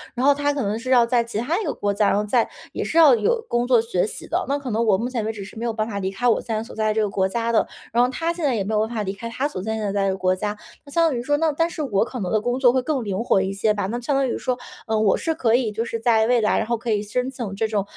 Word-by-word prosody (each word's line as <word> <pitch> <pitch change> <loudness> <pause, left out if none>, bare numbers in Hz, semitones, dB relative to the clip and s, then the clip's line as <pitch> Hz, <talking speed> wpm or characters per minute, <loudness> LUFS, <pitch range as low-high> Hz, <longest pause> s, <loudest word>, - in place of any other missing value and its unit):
然 250 - 0
后 285 - +7
他 290 0 0
可 280 - -2
能 210 +2 -1
是 255 +2 -6
要 245 -2 +5
在 235 0 +2
其 230 -2 -5
他 305 - 0
一 420 - -3
个 290 - -1
国 205 0 -1
家， 205 0 +2
然 - - +3
后 210 - +1
在 225 +3 +1 0.2
也 - - -4
是 - - -2
要 310 -5 +8
有 455 - +1
工 240 +1 0
作 245 -3 +5
学 210 -5 0
习 - - -6
的。 360 +3 -1
那 280 - 0
可 270 -4 -5
能 230 +2 +1
我 205 -4 +4
目 235 +5 -2
前 235 -4 -2
为 220 - -2
止 205 -2 -7
是 200 - -12
没 235 - -4
有 230 - -1
办 215 -1 -1
法 200 -2 -3
离 190 0 -1
开 220 +6 -4
我 - - +3
现 225 - -4
在 215 - -2
所 230 - -11
在 215 -1 +1
这 220 - +1
个 210 - 0
国 190 -1 +1
家 230 +3 -1
的， 230 - +2 0.2
然 235 - +3
后 250 - +3
他 330 +5 -1
现 340 -2 -3
在 265 -4 +2
也 205 - -1
没 210 +3 -3
有 210 - +2
办 220 +1 0
法 215 - -1
离 195 - -2
开 200 +4 -7
他 250 +4 -2
所 185 - -5
在 220 0 -2
的 195 -1 0
国 185 -1 +1
家， 205 +3 -3 0.3
那 285 - -13
相 335 -1 +4
当 - - -2
于 235 - -2
说 290 +4 +1
那 315 +1 +1
但 330 +3 0
是 325 - -6
我 220 -6 +1
可 245 -2 -6
能 180 - -3
的 215 - +3
工 245 +3 -1
作 255 -2 +5
会 260 0 +1
更 275 -2 -1
灵 200 0 -2
活 200 -5 +2
一 190 0 -1
些 205 +2 +1
吧。 205 -2 -2
那 240 +3 -3
相 270 +3 -1
当 275 - +2
于 - - -2
说， 250 -1 -2 0.3
呃， 220 - +1
我 215 -3 +3
是 325 -1 -1
可 235 -7 +2
以 240 -4 +1
就 220 +2 -2
是 230 -1 -4
在 225 -1 +3
未 245 -1 +3
来 215 - +2
然 - - -2
后 235 0 0
可 235 0 -3
以 210 -1 +1
申 250 +5 -2
请 230 -6 -5
这 220 +3 0
种， 210 -2 0
230 Hz, 375 characters per minute, -22 LUFS, 210-255 Hz, 0.3 s, 要